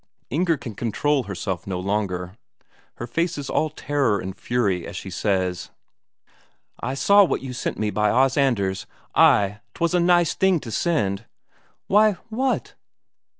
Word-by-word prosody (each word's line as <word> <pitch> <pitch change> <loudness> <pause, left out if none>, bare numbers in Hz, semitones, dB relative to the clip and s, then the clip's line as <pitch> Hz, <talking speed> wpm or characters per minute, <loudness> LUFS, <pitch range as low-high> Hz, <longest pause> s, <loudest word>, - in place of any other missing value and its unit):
Inger 165 +3 +1
can 115 -4 -7
control 130 +6 0
herself 95 -2 -4
no 95 -2 -2
longer. 95 -2 -2 0.6
Her 120 - -6
face 165 +8 -1
is 140 -2 -5
all 155 - +1
terror 145 -7 0
and 95 0 -6
fury 100 -8 -1
as 100 - -8
she 95 +2 -6
says: 95 -2 -1 1.1
"I 130 +2 -3
saw 200 +9 +6
what 185 - 0
you 130 -2 -5
sent 125 - -3
me 105 -1 -1
by 105 0 +1
Os 130 +3 +3
Anders. 100 -9 0 0.3
Ay, 100 +1 +4 0.2
'twas 170 +1 0
a 180 - +3
nice 175 -1 +3
thing 190 -3 +2
to 115 - -7
send!" 110 - 0 0.6
"Why... 210 +1 +4 0.2
what...?" 255 +4 -1
120 Hz, 150 wpm, -23 LUFS, 100-160 Hz, 1.1 s, saw